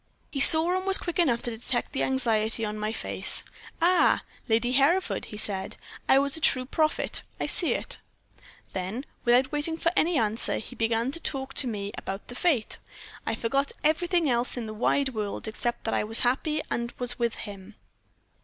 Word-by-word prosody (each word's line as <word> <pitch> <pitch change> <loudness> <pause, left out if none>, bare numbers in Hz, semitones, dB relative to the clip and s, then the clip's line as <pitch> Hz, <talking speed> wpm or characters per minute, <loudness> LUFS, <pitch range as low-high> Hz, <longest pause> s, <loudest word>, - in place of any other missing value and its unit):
"He 275 - -3
saw, 320 +5 +6
and 375 +1 -2
was 390 - +8
quick 345 0 -4
enough 250 -9 +2
to 240 -2 -4
detect 240 +2 -2
the 275 - -2
anxiety 225 -4 +1
on 210 0 -4
my 215 +1 -1
face. - - +1 0.4
"'Ah! 360 +1 +4 0.3
Lady 230 +2 +2
Hereford,' 290 +9 +2
he 210 - -9
said. 195 -2 0 0.3
'I - - +7
was 280 0 +2
a 320 - -2
true 255 -3 +4
prophet 310 +4 0 0.2
I - - -1
see - - +2
it.' - - -3 0.7
"Then, 195 +9 -4 0.2
without 250 +2 +4
waiting 300 +2 -1
for 335 - +1
any 335 0 +2
answer, 220 -1 0
he 250 - -8
began 230 +2 0
to 335 - -5
talk 270 -4 -2
to 265 - 0
me 205 -3 -4
about 195 +1 -6
the 245 - -8
fete. 275 -9 0 0.5
I 225 - 0
forgot 275 +5 -1
everything 340 +2 +2
else 245 0 0
in 240 - -3
the 215 - -6
wide, 265 +5 +1
world 215 -3 -4
except 235 +2 -3
that 225 - -2
I - - +1
was 220 +2 0
happy 300 +5 +1
and 235 0 -2
was 245 0 0
with 235 -1 0
him. 205 -1 -9
245 Hz, 190 wpm, -27 LUFS, 225-295 Hz, 0.7 s, was